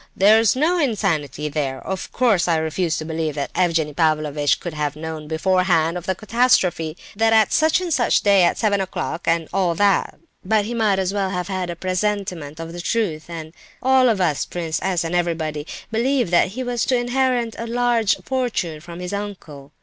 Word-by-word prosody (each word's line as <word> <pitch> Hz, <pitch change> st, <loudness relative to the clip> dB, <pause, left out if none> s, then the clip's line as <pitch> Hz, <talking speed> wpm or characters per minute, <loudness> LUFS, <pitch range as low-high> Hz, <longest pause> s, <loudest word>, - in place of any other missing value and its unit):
there's 215 Hz, +3 st, +5 dB
no 330 Hz, +6 st, +2 dB
insanity 165 Hz, -, -1 dB
there! 140 Hz, -3 st, -2 dB
Of 190 Hz, -1 st, -4 dB
course 225 Hz, -9 st, +2 dB
I 165 Hz, -2 st, +2 dB
refuse 160 Hz, +1 st, -1 dB
to 155 Hz, -, -5 dB
believe 160 Hz, -2 st, -3 dB
that 140 Hz, -2 st, -4 dB
Evgenie 165 Hz, -4 st, +1 dB
Pavlovitch 150 Hz, -2 st, +1 dB
could 175 Hz, -, -6 dB
have 150 Hz, -1 st, -2 dB
known 155 Hz, -1 st, -6 dB
beforehand 170 Hz, 0 st, +1 dB
of 180 Hz, -1 st, -6 dB
the 190 Hz, -, 0 dB
catastrophe; 190 Hz, -8 st, +1 dB, 0.2 s
that 225 Hz, +2 st, +2 dB
is, -, -, +5 dB
that -, -, +3 dB
at 220 Hz, -2 st, +4 dB
such 315 Hz, +2 st, +3 dB
and 350 Hz, -3 st, -1 dB
such 245 Hz, -4 st, +3 dB
a -, -, -2 dB
day 200 Hz, -2 st, +5 dB
at -, -, +2 dB
seven 205 Hz, -2 st, +1 dB
o'clock, 180 Hz, -3 st, -4 dB
and 165 Hz, -1 st, +1 dB
all 180 Hz, -3 st, +1 dB
that; 200 Hz, +2 st, +2 dB, 0.3 s
but 210 Hz, +1 st, +1 dB
he 235 Hz, -, -4 dB
might 215 Hz, -4 st, +2 dB
well 200 Hz, -1 st, -1 dB
have 180 Hz, 0 st, -3 dB
had 185 Hz, -2 st, -2 dB
a 175 Hz, -, -4 dB
presentiment 185 Hz, -4 st, -2 dB
of 165 Hz, 0 st, -7 dB
the 175 Hz, -, -6 dB
truth. 175 Hz, -6 st, -2 dB
And 160 Hz, -2 st, -7 dB, 0.3 s
I—all 260 Hz, -1 st, +5 dB
of 215 Hz, -4 st, +1 dB
us—Prince 165 Hz, 0 st, -1 dB
S. 185 Hz, -2 st, 0 dB
and 165 Hz, +1 st, -4 dB
everybody, 160 Hz, -3 st, -1 dB, 0.2 s
believed 245 Hz, -2 st, +1 dB
that 175 Hz, -, +4 dB
he 240 Hz, +8 st, -5 dB
was 245 Hz, -1 st, -1 dB
to 255 Hz, -, +2 dB
inherit 245 Hz, -1 st, 0 dB
a 230 Hz, -, -4 dB
large 235 Hz, -2 st, +2 dB
fortune 240 Hz, -12 st, -2 dB
from 170 Hz, +1 st, -10 dB
this 180 Hz, +2 st, -5 dB
uncle. 175 Hz, -9 st, -7 dB
185 Hz, 195 wpm, -21 LUFS, 160-220 Hz, 0.3 s, there's